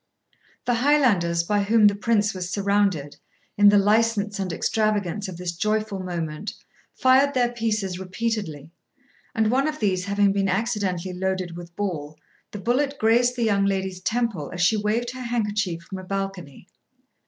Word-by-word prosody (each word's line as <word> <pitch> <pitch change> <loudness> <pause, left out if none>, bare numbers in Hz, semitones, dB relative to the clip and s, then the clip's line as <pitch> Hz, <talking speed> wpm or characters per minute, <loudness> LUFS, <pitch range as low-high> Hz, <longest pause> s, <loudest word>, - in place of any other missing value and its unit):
The 245 - +2
Highlanders 230 - +3
by 205 +4 +1
whom 215 +2 +4
the 205 - +6
Prince 210 0 +1
was 180 -1 -5
surrounded, 195 -7 0 0.4
in 205 0 +7
the 205 - +5
license 210 0 +2
and 190 -2 -2
extravagance 210 0 -1
of 185 -3 -7
this 180 -1 -3
joyful 215 +2 -1
moment, 175 0 -4 0.4
fired 265 +2 +4
their 245 -1 +2
pieces 215 -6 -2
repeatedly, 190 -6 -4 0.6
and 220 0 +2
one 270 +3 +2
of 305 0 -3
these 185 -4 0
having 200 0 +2
been 195 -1 0
accidentally 190 -3 -1
loaded 185 -1 -2
with 170 0 -10
ball, 155 -7 -4 0.3
the - - -7
bullet 265 +7 0
grazed 240 +2 +3
the 240 - -1
young 200 -3 +2
lady's 190 -1 -2
temple 220 -8 -1
as 175 - -4
she 180 +5 +4
waved 220 +3 -1
her 255 - -8
handkerchief 210 -7 -2
from 190 +2 -7
a - - -9
balcony. 195 -6 -5
200 Hz, 160 wpm, -24 LUFS, 185-225 Hz, 0.6 s, in